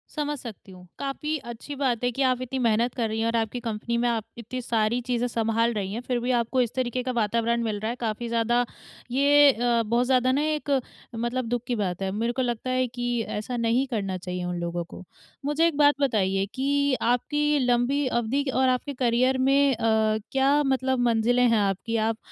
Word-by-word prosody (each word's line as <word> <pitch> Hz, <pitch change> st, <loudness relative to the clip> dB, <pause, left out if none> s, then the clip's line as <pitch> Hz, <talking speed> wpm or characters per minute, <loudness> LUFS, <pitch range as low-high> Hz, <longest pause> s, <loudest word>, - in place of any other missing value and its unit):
समझ 295 Hz, -1 st, -2 dB
सकती 220 Hz, -5 st, -10 dB
हूँ, 180 Hz, -1 st, -14 dB
काफ़ी 300 Hz, +3 st, -2 dB
अच्छी 240 Hz, +2 st, -8 dB
बात 255 Hz, -4 st, -1 dB
है 245 Hz, -, +2 dB
कि 270 Hz, -, -4 dB
आप 255 Hz, -1 st, +1 dB
इतनी 260 Hz, +1 st, -3 dB
मेहनत 235 Hz, 0 st, +2 dB
कर 235 Hz, -3 st, 0 dB
रही 220 Hz, +1 st, -2 dB
हैं 225 Hz, -, 0 dB
और 230 Hz, -, 0 dB
आपकी 225 Hz, +1 st, -1 dB
कंपनी 235 Hz, 0 st, -3 dB
में 245 Hz, -, +1 dB
आप 225 Hz, -2 st, -1 dB
इतनी 250 Hz, +2 st, -6 dB
सारी 230 Hz, 0 st, 0 dB
चीज़ें 245 Hz, -1 st, 0 dB
सँभाल 230 Hz, 0 st, 0 dB
रही 200 Hz, -1 st, -3 dB
हैं 235 Hz, -, -4 dB
फिर 250 Hz, -1 st, -1 dB
भी 245 Hz, +2 st, -1 dB
आपको 245 Hz, +1 st, +1 dB
इस 235 Hz, -, -1 dB
तरीके 250 Hz, -1 st, -1 dB
का 255 Hz, -, -2 dB
वातावरण 235 Hz, +1 st, 0 dB
मिल 215 Hz, -2 st, -2 dB
रहा 220 Hz, -, -2 dB
है, 235 Hz, -, -3 dB
काफ़ी 230 Hz, 0 st, -3 dB
ज़्यादा 235 Hz, +1 st, +1 dB, 0.5 s
ये 285 Hz, +2 st, +6 dB
अ, 240 Hz, -1 st, +1 dB
बहुत 235 Hz, +3 st, +1 dB
ज़्यादा 255 Hz, 0 st, +3 dB
ना 280 Hz, +3 st, +1 dB
एक 305 Hz, -1 st, -2 dB, 0.5 s
मतलब 240 Hz, +2 st, -2 dB
दुःख 245 Hz, -1 st, -1 dB
की 245 Hz, -, 0 dB
बात 190 Hz, -4 st, -2 dB
है, 190 Hz, 0 st, -1 dB
मेरे 230 Hz, +4 st, -1 dB
को 260 Hz, -, -1 dB
लगता 240 Hz, 0 st, -2 dB
है 255 Hz, 0 st, +1 dB
कि 245 Hz, 0 st, -2 dB
ऐसा 230 Hz, +4 st, -4 dB
नहीं 235 Hz, +3 st, +1 dB
करना 195 Hz, -6 st, -2 dB
चाहिए 180 Hz, 0 st, -5 dB
उन 180 Hz, 0 st, -3 dB
लोगों 170 Hz, 0 st, -3 dB
को। 175 Hz, -, -11 dB, 0.4 s
मुझे 295 Hz, +3 st, +2 dB
एक 315 Hz, -, -2 dB
बात 290 Hz, -1 st, +5 dB
बताइए 195 Hz, -7 st, +1 dB
कि 280 Hz, +1 st, +1 dB
आपकी 295 Hz, +5 st, +1 dB
लंबी 250 Hz, +4 st, +2 dB
अवधि 240 Hz, +3 st, 0 dB
क -, -, -3 dB
और 260 Hz, 0 st, +4 dB
आपके 255 Hz, +3 st, -1 dB
करियर 255 Hz, +1 st, +2 dB
में 275 Hz, +1 st, +3 dB
अ, 220 Hz, -1 st, +2 dB
क्या 275 Hz, +2 st, +3 dB
मतलब 265 Hz, -1 st, 0 dB
मंजिलें 240 Hz, +2 st, +3 dB
हैं 230 Hz, -, +3 dB
आपकी? 200 Hz, +3 st, -1 dB
आप 220 Hz, 0 st, 0 dB
240 Hz, 215 wpm, -25 LUFS, 225-260 Hz, 0.5 s, ये